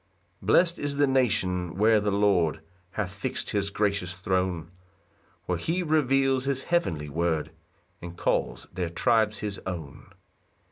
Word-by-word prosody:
1 95 - -12
Blest 170 +9 +4
is 145 -1 -2
the 145 0 +4
nation 95 - +1
where 110 +2 +4
the 105 0 0
Lord 100 -6 +2 0.3
Hath 100 -3 -3
fix'd 120 +6 -3
his 100 -2 +1
gracious 100 -3 -1
throne; 95 -4 -1 0.7
Where 90 -2 -1
he 175 - 0
reveals 135 -4 +2
his 135 -1 -1
heavenly 95 - 0
word, 80 +1 -1 0.5
And 85 0 -8
calls - - -1
their 90 -2 -2
tribes 110 +4 +2
his 100 -2 -4
own. 80 -7 -7
100 Hz, 140 wpm, -27 LUFS, 90-130 Hz, 0.7 s, Blest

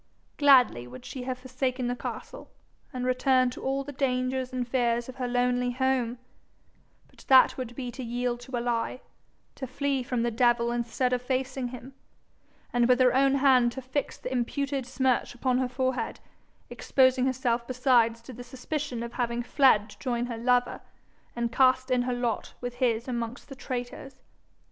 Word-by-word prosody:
Gladly 250 - +5
would 125 +1 -11
she 255 -2 -6
have 255 -1 -3
forsaken 255 0 -3
the 245 0 -1
castle, - - -7 0.4
and 250 -3 -4
returned 255 0 +2
to - - -9
all 270 +1 -1
the 285 - -7
dangers 255 -1 -1
and 250 -2 -3
fears 240 -2 0
of 260 0 -9
her 255 -2 -2
lonely 245 0 +1
home; 255 -2 0 0.9
but - - -23
that 260 -1 +6
would 245 -2 -6
be 250 -2 -5
to 260 - -8
yield 240 0 -2
to 245 +1 -5
a - - -1
lie, 240 +1 -2 0.5
to 265 - -6
flee 275 +1 -1
from 250 -2 -2
the 240 - 0
devil 235 0 +2
instead 240 +2 -1
of 250 - 0
facing 260 0 -2
him, 250 +2 -9 0.8
and 240 0 +3
with 250 0 +5
her 250 -1 +5
own 270 +1 +4
hand 260 -3 +4
to 265 - -6
fix 260 +2 -3
the 255 - -6
imputed 270 +1 -2
smirch 260 -2 0
upon 255 +1 +1
her 255 -1 0
forehead, 260 0 -2 0.5
exposing 260 -1 +2
herself 245 -2 -1
besides 245 -3 +2
to 255 - -10
the 245 +1 -9
suspicion 255 0 -4
of 235 0 -7
having 240 -1 -1
fled 245 -5 +4
to - - -15
join 240 -2 -1
her 240 -2 -5
lover, 245 +1 +1 0.5
and 235 -1 -1
cast 255 0 +3
in 250 -1 +3
her 250 0 -1
lot 240 -2 -3
with 245 0 -5
his 235 -1 +1
amongst 240 +1 -4
the 270 - -8
traitors. 255 +1 -6
250 Hz, 175 wpm, -27 LUFS, 240-260 Hz, 0.9 s, that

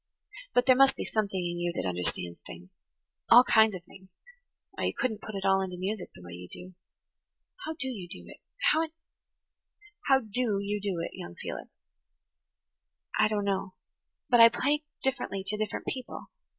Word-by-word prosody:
But 245 - +5
there 255 -1 +7
must 270 +1 +6
be - - -4
something 205 -3 -1
in 175 -1 -2
you 175 0 0
that - - -1
understands 85 -1 -3
things–all 90 - +1
kinds 220 -4 +5
of 180 - -8
things–or 195 - -14
you - - 0
couldn't 220 -5 -1
put 215 - -7
it 195 - -3
all 195 0 +4
into 185 -1 -4
music 190 +1 -3
the 90 - -13
way 90 - -10
you 90 +1 -9
do. 185 +1 -8 0.9
How 320 - -2
do 275 -4 -3
you 205 -9 -5
do - - -8
it? - - -12 0.3
How 315 - +3
in–how 325 0 -4
do 220 -1 0
you 205 +1 -2
do 195 -3 -2
it, - - -4
young 85 0 -8
Felix?" - - -6 1.5
"I - - +6
don't 210 -1 -1
know. 190 -1 -1 0.5
But 240 - +4
I 230 0 +11
play 290 +5 +1 0.2
differently 255 -7 -1
to 205 +2 -1
different 215 -1 -3
people. 255 -2 -6
205 Hz, 170 wpm, -29 LUFS, 180-255 Hz, 1.5 s, I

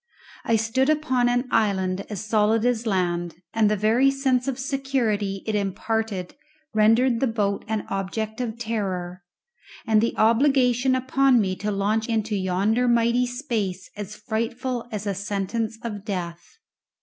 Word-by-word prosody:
I 230 - +3
stood 225 +5 +1
upon 265 -6 +2
an 245 +1 0
island 195 -3 +1
as 210 -1 -5
solid 215 +1 +2
as 240 -2 0
land, 175 -3 -1 0.2
and 220 -2 +3
the 215 - +2
very 225 +6 +3
sense 270 -2 +1
of 265 -2 -1
security 255 -8 -1
it 220 - -2
imparted 205 -1 -2 0.4
rendered 225 +3 +4
the 270 - +2
boat 205 -3 -1
an 215 -1 -2
object 215 +4 -3
of 235 -2 -3
terror, 190 -6 -3 0.6
and 220 -1 +4
the 230 - -1
obligation 250 +2 +3
upon 260 0 +3
me 190 -3 0
to 210 - -3
launch 210 +3 0
into 220 -1 0
yonder 200 +6 +1
mighty 235 +1 +3
space 225 -8 -3
as 210 0 -7
frightful 230 +3 -3
as 210 -1 -4
a 200 - 0
sentence 205 +3 -3
of 210 -4 -5
death. 175 - -5
220 Hz, 150 wpm, -24 LUFS, 200-245 Hz, 0.6 s, rendered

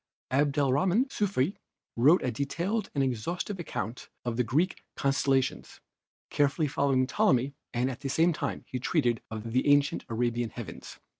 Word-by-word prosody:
Abdelrahman 145 - +2
Sufi 195 -4 0 0.4
wrote 145 +10 +5
a 125 - 0
detailed 170 - -2
and 140 - +2
exhaustive 165 - -2
account 120 - -5 0.2
of 120 -1 -1
the 125 - +2
Greek 155 - 0
constellations, 135 -1 0 0.5
carefully 145 +2 +2
following 140 -2 +2
Ptolemy, 130 +1 +2 0.2
and 125 +2 0
at 125 - -8
the 135 - -4
same 165 +5 +3
time - - -4
he 125 - -4
treated 125 -4 +1
of 110 +1 -6
the 130 +3 +2
ancient 145 0 +3
Arabian 120 0 0
heavens. - - -9
135 Hz, 145 wpm, -29 LUFS, 125-155 Hz, 0.5 s, wrote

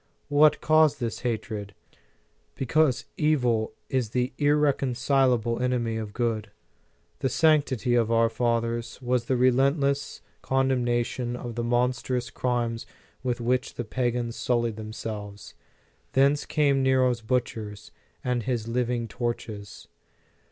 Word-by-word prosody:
What 150 +1 +5
caused 155 -2 +4
its 115 - -3
hatred? 110 -4 -4 0.8
Because 145 -1 +1
evil 125 -8 +1
is 130 -5 -1
the 125 +2 -1
irreconcilable 135 -4 +2
enemy 120 -3 0
of 110 -2 -5
good. 115 -1 -1 0.7
The 135 - 0
sanctity 140 -5 +2
of 115 -2 +3
our 115 0 +4
fathers 115 0 -1
was 125 -2 0
the 130 +1 +1
relentless 140 +3 +2 0.2
condemnation 125 -2 0
ot 120 -1 -6
the 120 +1 -3
monstrous 125 +1 0
crimes 120 -2 -2 0.3
with 125 -2 -2
which 125 +2 -1
the 120 - -4
pagans 120 0 -1
sullied 120 -3 0
themselves. 105 -1 -7 0.6
Thence 140 +2 +3
came 140 -3 +2
Nero 130 -1 +3
s 120 -1 -4
butchers 110 -3 -3 0.3
and 125 -2 0
his 120 -2 -2
living 120 0 -1
torches. 110 -3 -5
125 Hz, 115 wpm, -26 LUFS, 115-130 Hz, 0.8 s, What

